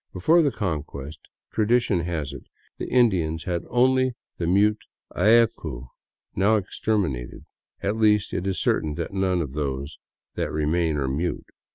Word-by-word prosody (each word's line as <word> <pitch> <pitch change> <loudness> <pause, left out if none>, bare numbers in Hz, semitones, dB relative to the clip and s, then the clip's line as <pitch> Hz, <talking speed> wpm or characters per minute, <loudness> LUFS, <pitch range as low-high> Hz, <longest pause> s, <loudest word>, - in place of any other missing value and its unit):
Before 160 - +4
the 150 - +3
Conquest, 75 - -4 0.3
tradition 110 -3 +2
has 80 -5 -3
it, 70 - -10 0.3
the - - -4
Indians 90 -10 +2
had 85 -2 -2
only 130 +1 +3 0.2
the 85 - -1
mute 105 +4 +3 0.4
allcu, 110 - +2 0.5
now 100 +4 +3
exterminated 95 - -2 0.2
— - - -45
at 100 +2 0
least, 105 -2 +3
it 90 - -2
is 95 -4 -1
certain 75 -1 0
that 85 +4 -4
none 95 -3 +1
of 70 -3 -7
those 70 0 -4 0.3
that - - -2
remain 80 +1 0
are 70 -2 -1
mute. 80 +7 -2
90 Hz, 150 wpm, -24 LUFS, 75-110 Hz, 0.5 s, Before